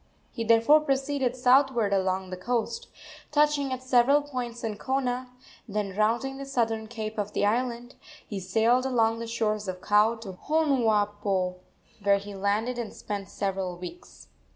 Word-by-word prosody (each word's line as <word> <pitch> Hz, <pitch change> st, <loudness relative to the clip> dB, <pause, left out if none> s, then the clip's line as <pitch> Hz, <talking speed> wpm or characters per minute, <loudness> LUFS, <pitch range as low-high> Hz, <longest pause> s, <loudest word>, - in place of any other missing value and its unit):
He 230 Hz, -, -4 dB
therefore 230 Hz, +7 st, +5 dB
proceeded 275 Hz, -3 st, 0 dB
southward 250 Hz, -4 st, +3 dB
along 190 Hz, -1 st, 0 dB
the -, -, -3 dB
coast, 240 Hz, -, -2 dB, 0.4 s
touching 295 Hz, -2 st, +2 dB
at 255 Hz, 0 st, -4 dB
several 260 Hz, +3 st, +4 dB
points 245 Hz, -4 st, -5 dB
in 215 Hz, -2 st, -3 dB
Kona; 255 Hz, -1 st, -1 dB, 0.4 s
then 205 Hz, -2 st, -3 dB
rounding 235 Hz, +6 st, +1 dB
the 275 Hz, -, -5 dB
southern 225 Hz, -4 st, -1 dB
cape 220 Hz, -2 st, -5 dB
of 205 Hz, 0 st, -3 dB
the -, -, +1 dB
island, 240 Hz, +3 st, -1 dB, 0.3 s
he 205 Hz, -, -4 dB
sailed 225 Hz, +7 st, +2 dB
along 230 Hz, -3 st, +2 dB
the 230 Hz, -, -5 dB
shores 215 Hz, -3 st, -1 dB
of 185 Hz, -1 st, -4 dB
Kau 210 Hz, +4 st, +3 dB
to 195 Hz, -5 st, -9 dB
Honuapo, 210 Hz, -11 st, +1 dB, 0.4 s
where 200 Hz, 0 st, +4 dB
he 200 Hz, +1 st, -8 dB
landed 210 Hz, +5 st, -1 dB
and 230 Hz, -3 st, -4 dB
spent 200 Hz, -2 st, -5 dB
several 190 Hz, -2 st, -3 dB
weeks. 185 Hz, -, -11 dB
230 Hz, 150 wpm, -27 LUFS, 205-255 Hz, 0.4 s, therefore